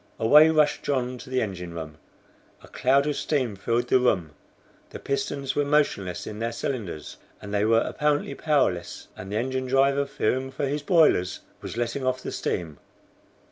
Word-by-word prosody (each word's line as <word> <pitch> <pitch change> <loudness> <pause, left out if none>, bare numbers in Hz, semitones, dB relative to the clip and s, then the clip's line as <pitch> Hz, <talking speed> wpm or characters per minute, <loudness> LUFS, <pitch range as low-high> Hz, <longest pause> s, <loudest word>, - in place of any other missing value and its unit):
Away 150 +8 +7
rushed 155 -2 +2
John 125 -2 -2
to 130 - -11
the 130 -2 +1
engine 90 -5 -6
room. 80 -1 -7 0.6
A - - -13
cloud 135 +2 +2
of 150 -1 -1
steam 130 -8 -1
filled 115 +5 -1
the 130 - +5
room. 95 -11 +1 0.6
The - - -8
pistons 140 0 -2
were 145 - +2
motionless 140 -11 0
in 105 0 -7
their 115 +1 -1
cylinders, 110 - -5 0.2
and 100 0 -8
they 105 0 +2
were 115 +1 +4
apparently 150 -1 0
powerless, 140 - -1
and 95 +1 -9
the 105 - -1
engine 130 +2 -2
driver, 140 +2 +2
fearing 130 +1 -1
for 135 +2 -3
his 145 +2 -2
boilers, 145 - +3 0.2
was - - -7
letting 120 +3 -2
off 130 0 -1
the - - -4
steam. 80 -4 -3
130 Hz, 175 wpm, -25 LUFS, 105-140 Hz, 0.6 s, Away